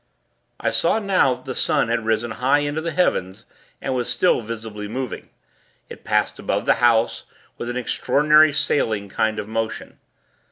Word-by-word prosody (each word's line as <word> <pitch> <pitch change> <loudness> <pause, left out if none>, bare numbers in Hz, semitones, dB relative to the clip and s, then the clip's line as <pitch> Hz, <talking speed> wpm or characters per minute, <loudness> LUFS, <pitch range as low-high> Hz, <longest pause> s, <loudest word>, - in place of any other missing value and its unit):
I - - 0
saw - - +2
now, 190 - +2
that 125 - -18
the 130 - -4
sun 115 - +1
had 115 -1 -1
risen 115 +1 0
high 130 +6 +2
into 145 +2 -2
the 170 - -3
heavens, 115 - -1 0.3
and 130 - -3
was 125 -2 -2
still 180 - +2
visibly 110 -2 -7
moving. 125 +2 -5 0.6
It - - -11
passed - - 0
above - - -2
the - - +5
house, 115 -1 +2 0.3
with 120 - -4
an 120 - -3
extraordinary 150 +5 +3
sailing 110 -8 0
kind 110 +2 0
of - - -4
motion. 110 0 -4
120 Hz, 165 wpm, -22 LUFS, 110-145 Hz, 0.6 s, the